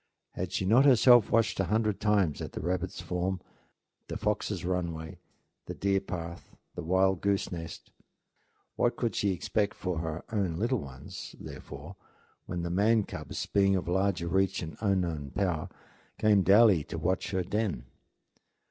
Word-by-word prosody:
Had 90 Hz, 0 st, -4 dB
she 95 Hz, -, -1 dB
not 115 Hz, +8 st, +5 dB
herself 120 Hz, -4 st, +7 dB
watched 115 Hz, -2 st, +2 dB
a 95 Hz, -, +2 dB
hundred 105 Hz, +1 st, 0 dB
times 100 Hz, -8 st, +2 dB
at -, -, -6 dB
the -, -, -5 dB
rabbit's 90 Hz, +2 st, -2 dB
form, 90 Hz, +1 st, -2 dB, 0.7 s
the -, -, -4 dB
fox's -, -, -2 dB
runway, 85 Hz, -3 st, -3 dB, 0.5 s
the -, -, -5 dB
deer 100 Hz, 0 st, +1 dB
path, 85 Hz, -3 st, -7 dB, 0.2 s
the -, -, -5 dB
wild 95 Hz, +2 st, +2 dB
goose 100 Hz, -1 st, 0 dB
nest? 80 Hz, -2 st, -7 dB, 0.9 s
What -, -, +2 dB
could -, -, -2 dB
she 100 Hz, -, +1 dB
expect 100 Hz, +3 st, -1 dB
for 90 Hz, -3 st, -3 dB
her 80 Hz, 0 st, -4 dB
own 100 Hz, -6 st, 0 dB
little 120 Hz, +4 st, +1 dB
ones, 65 Hz, -6 st, -9 dB
therefore, 75 Hz, +8 st, -9 dB, 0.5 s
when 85 Hz, -1 st, -3 dB
the 85 Hz, -, -3 dB
man 105 Hz, +4 st, +3 dB
cubs, -, -, -6 dB
beings 100 Hz, -1 st, +3 dB
of 90 Hz, -, -4 dB
larger 90 Hz, -1 st, 0 dB
reach 95 Hz, +1 st, +1 dB
and 80 Hz, -, -7 dB
unknown 85 Hz, -9 st, -1 dB
power, 90 Hz, -6 st, -1 dB, 0.5 s
came 105 Hz, -2 st, +4 dB
daily 100 Hz, -4 st, +6 dB
to -, -, -6 dB
watch 95 Hz, +2 st, -1 dB
at 95 Hz, -2 st, 0 dB
her -, -, -15 dB
den? 100 Hz, -, -1 dB
95 Hz, 160 wpm, -29 LUFS, 85-100 Hz, 0.9 s, herself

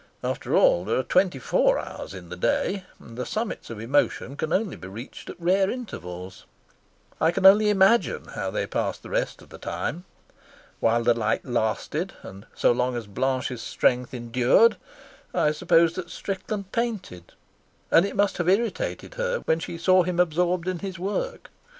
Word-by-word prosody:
After -, -, -1 dB
all, 85 Hz, -, +5 dB
there -, -, 0 dB
are 130 Hz, -, +1 dB
twenty 180 Hz, +2 st, +2 dB
four 125 Hz, -, +2 dB
hours -, -, -7 dB
in 90 Hz, -2 st, -10 dB
the 90 Hz, -, -6 dB
day, 185 Hz, -, 0 dB
and 115 Hz, -, -13 dB
the 125 Hz, -, -3 dB
summits 215 Hz, -, -4 dB
of 115 Hz, -2 st, -7 dB
emotion 135 Hz, +2 st, 0 dB
can 155 Hz, +2 st, -3 dB
only 200 Hz, 0 st, 0 dB
be -, -, -10 dB
reached 110 Hz, +7 st, -9 dB
at -, -, -9 dB
rare 190 Hz, +3 st, +2 dB
intervals. 90 Hz, -, -7 dB, 0.7 s
I 160 Hz, -, +5 dB
can 190 Hz, +3 st, -1 dB
only 210 Hz, +2 st, +8 dB
imagine 205 Hz, +3 st, +3 dB
how -, -, -3 dB
they -, -, -2 dB
passed -, -, -2 dB
the -, -, -10 dB
rest -, -, -2 dB
of -, -, -19 dB
the -, -, -12 dB
time. 175 Hz, +3 st, -4 dB, 0.7 s
While 115 Hz, +1 st, +2 dB
the 120 Hz, 0 st, +4 dB
light 110 Hz, -1 st, -1 dB
lasted 120 Hz, -, -1 dB
and 95 Hz, +2 st, -11 dB
so -, -, +4 dB
long 125 Hz, 0 st, 0 dB
as 115 Hz, -, -5 dB
Blanche's 125 Hz, +3 st, -2 dB
strength 125 Hz, +2 st, +1 dB
endured, 125 Hz, -, +3 dB, 0.6 s
I 150 Hz, -, +3 dB
suppose 165 Hz, +1 st, +3 dB
that 175 Hz, -1 st, -6 dB
Strickland 195 Hz, 0 st, -5 dB
painted, 205 Hz, -, -3 dB, 0.6 s
and 165 Hz, -, +6 dB
it 200 Hz, -, -3 dB
must 205 Hz, -1 st, +2 dB
have 175 Hz, 0 st, +1 dB
irritated 235 Hz, -, -1 dB
her -, -, -1 dB
when 160 Hz, -, +1 dB
she 170 Hz, -, -6 dB
saw 185 Hz, +2 st, +4 dB
him 175 Hz, 0 st, -2 dB
absorbed 175 Hz, +1 st, +1 dB
in 185 Hz, -2 st, -1 dB
his 190 Hz, -1 st, -5 dB
work. 345 Hz, -, -4 dB
170 Hz, 175 wpm, -25 LUFS, 120-195 Hz, 0.7 s, only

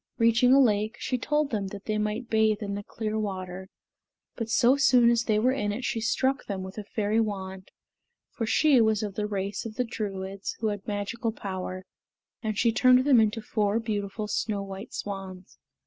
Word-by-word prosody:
Reaching 230 Hz, +2 st, +4 dB
a 270 Hz, -, +7 dB
lake, 215 Hz, -3 st, +2 dB
she 255 Hz, -, -2 dB
told 295 Hz, +2 st, 0 dB
them 205 Hz, -4 st, -1 dB
that 200 Hz, +1 st, -9 dB
they 215 Hz, -1 st, -1 dB
might 215 Hz, +3 st, -2 dB
bathe 220 Hz, -1 st, +2 dB
in 200 Hz, -1 st, -3 dB
the 200 Hz, -, -3 dB
clear 215 Hz, +1 st, -4 dB
water; 190 Hz, -2 st, -5 dB, 0.7 s
but 230 Hz, -2 st, -4 dB
so 240 Hz, +3 st, +4 dB
soon 250 Hz, -4 st, +5 dB
as 235 Hz, 0 st, +1 dB
they 215 Hz, -2 st, +2 dB
were 245 Hz, +4 st, +3 dB
in 210 Hz, -6 st, -1 dB
it 240 Hz, +5 st, -4 dB
she 225 Hz, -, -1 dB
struck 265 Hz, +4 st, +1 dB
them 195 Hz, -2 st, -3 dB
with 190 Hz, +3 st, -7 dB
a -, -, -5 dB
fairy 210 Hz, +1 st, 0 dB
wand, 190 Hz, -3 st, -3 dB, 0.6 s
for 225 Hz, -, -3 dB
she 280 Hz, 0 st, +4 dB
was 220 Hz, -1 st, +2 dB
of 205 Hz, -2 st, -4 dB
the 210 Hz, +1 st, -2 dB
race 200 Hz, -1 st, -3 dB
of 225 Hz, -2 st, -7 dB
the 250 Hz, -, +1 dB
Druids, 195 Hz, -4 st, -5 dB
who 220 Hz, -, 0 dB
had 205 Hz, -1 st, -5 dB
magical 210 Hz, +3 st, -2 dB
power, 185 Hz, -3 st, -5 dB, 0.6 s
and 215 Hz, -2 st, -3 dB
she 230 Hz, +1 st, +3 dB
turned 255 Hz, +2 st, +5 dB
them 270 Hz, -5 st, +6 dB
into 220 Hz, +1 st, 0 dB
four 210 Hz, 0 st, 0 dB
beautiful 210 Hz, -1 st, -3 dB
snow 205 Hz, -1 st, -1 dB
white 195 Hz, +2 st, -8 dB
swans. 190 Hz, -2 st, -7 dB
215 Hz, 195 wpm, -27 LUFS, 200-235 Hz, 0.7 s, a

